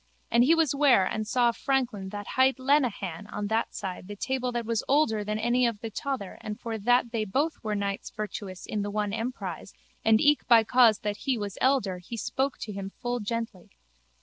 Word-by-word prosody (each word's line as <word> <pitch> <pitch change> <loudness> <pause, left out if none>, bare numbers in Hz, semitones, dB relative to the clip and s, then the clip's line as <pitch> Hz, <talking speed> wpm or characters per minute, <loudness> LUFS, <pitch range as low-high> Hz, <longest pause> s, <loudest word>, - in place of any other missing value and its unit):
And 235 +1 +5
he 315 +6 +5
was 320 -4 +2
ware 275 -9 +5
and 215 +2 -3
saw 240 0 +3
a - - -1
franklin 240 -8 -1
that 205 0 -7
hight 260 +1 +3
Lenehan 245 - 0
on 210 0 -4
that 225 +1 -1
side 185 -2 -5
the 205 - -7
table 255 +3 -2
that 240 -1 -2
was 230 0 -1
older 265 -7 +2
than 210 +1 -2
any 240 +3 +2
of 230 -3 -3
the 225 0 -6
tother 255 -3 -4
and 210 -1 -6
for 225 -2 -4
that 245 +2 +2
they 225 -2 -1
both 275 +11 -1
were 215 -1 -1
knights 200 -1 -3
virtuous 205 -3 -6
in 210 - -2
the 205 - -3
one 205 -1 -2
emprise 230 +3 -5 0.3
and 220 -1 +5
eke 295 +3 +3
by 230 -2 +7
cause 230 -2 +5
that 210 0 -2
he 265 0 -1
was 205 -2 -4
elder 250 -9 +2
he 210 +6 -8
spoke 265 +4 -1
to 215 - -5
him 195 0 -5
full 245 0 -2
gently. 225 -3 -4
225 Hz, 210 wpm, -27 LUFS, 205-255 Hz, 0.3 s, by